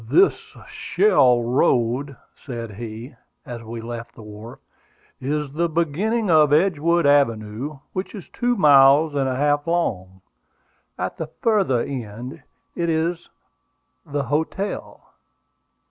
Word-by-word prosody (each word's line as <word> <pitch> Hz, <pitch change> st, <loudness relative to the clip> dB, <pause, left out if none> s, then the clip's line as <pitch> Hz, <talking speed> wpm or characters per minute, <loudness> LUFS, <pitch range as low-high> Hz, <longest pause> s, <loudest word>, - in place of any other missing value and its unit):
"This 390 Hz, -, +2 dB
shell 125 Hz, -, +3 dB
road," 125 Hz, +2 st, +1 dB, 0.2 s
said 115 Hz, -5 st, -7 dB
he, 115 Hz, +4 st, -8 dB, 0.3 s
as 120 Hz, -1 st, -7 dB
we 115 Hz, 0 st, -7 dB
left 115 Hz, 0 st, -7 dB
the 110 Hz, -, -12 dB
wharf, 105 Hz, +2 st, -10 dB, 0.6 s
"is 145 Hz, +1 st, -2 dB
the 170 Hz, +4 st, -1 dB
beginning 175 Hz, +8 st, 0 dB
of 155 Hz, -4 st, +5 dB
Edgewood 170 Hz, 0 st, +2 dB
Avenue, 135 Hz, -1 st, +1 dB, 0.2 s
which 185 Hz, +4 st, -4 dB
is 195 Hz, -, -9 dB
two 245 Hz, 0 st, 0 dB
miles 145 Hz, -, +6 dB
and 135 Hz, -2 st, 0 dB
a 130 Hz, -, -2 dB
half 145 Hz, +2 st, +1 dB
long. 95 Hz, -, -2 dB, 0.8 s
At 90 Hz, +1 st, -4 dB
the 160 Hz, -, -4 dB
farther 190 Hz, -, +1 dB
end 120 Hz, -2 st, -6 dB
of -, -, -15 dB, 0.4 s
it 170 Hz, -1 st, -1 dB
is 165 Hz, +2 st, -1 dB, 0.7 s
the 145 Hz, -2 st, -3 dB
hotel." 160 Hz, -, -4 dB
140 Hz, 125 wpm, -22 LUFS, 120-165 Hz, 0.8 s, miles